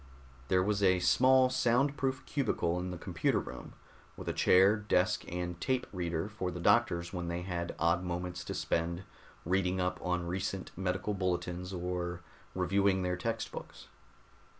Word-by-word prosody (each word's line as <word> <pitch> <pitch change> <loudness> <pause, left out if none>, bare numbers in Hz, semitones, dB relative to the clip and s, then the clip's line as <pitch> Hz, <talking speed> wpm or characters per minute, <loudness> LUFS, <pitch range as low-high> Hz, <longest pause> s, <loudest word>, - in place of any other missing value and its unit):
There 90 +3 +3
was 100 +1 0
a 95 -2 +5
small 130 +7 +5
sound 130 +4 +2
proof 135 -2 -2
cubicle 90 - 0
in 90 +1 -3
the 90 - -5
computer 85 -1 0
room, - - -8 0.4
with - - -8
a - - 0
chair, 95 +3 +5
desk 105 -6 0
and 90 0 -3
a - - -22
tape 130 +5 0
reader 85 -1 -2
for 105 -4 -4
the 90 - -6
doctors 85 -3 +2
when 90 -2 -3
they 85 +1 -3
had 85 -2 -3
odd 85 +2 +2
moments 90 0 -4
to - - -4
spend 85 +2 -1 0.4
reading 95 +1 +1
up 90 0 -1
on 90 -1 -1
recent 95 +2 -3
medical 95 +2 -1
bulletins 90 -1 -2
or 90 -1 -3 0.3
reviewing 95 +1 +2
their 90 0 0
textbooks. 115 +6 -5
90 Hz, 160 wpm, -32 LUFS, 90-100 Hz, 0.4 s, a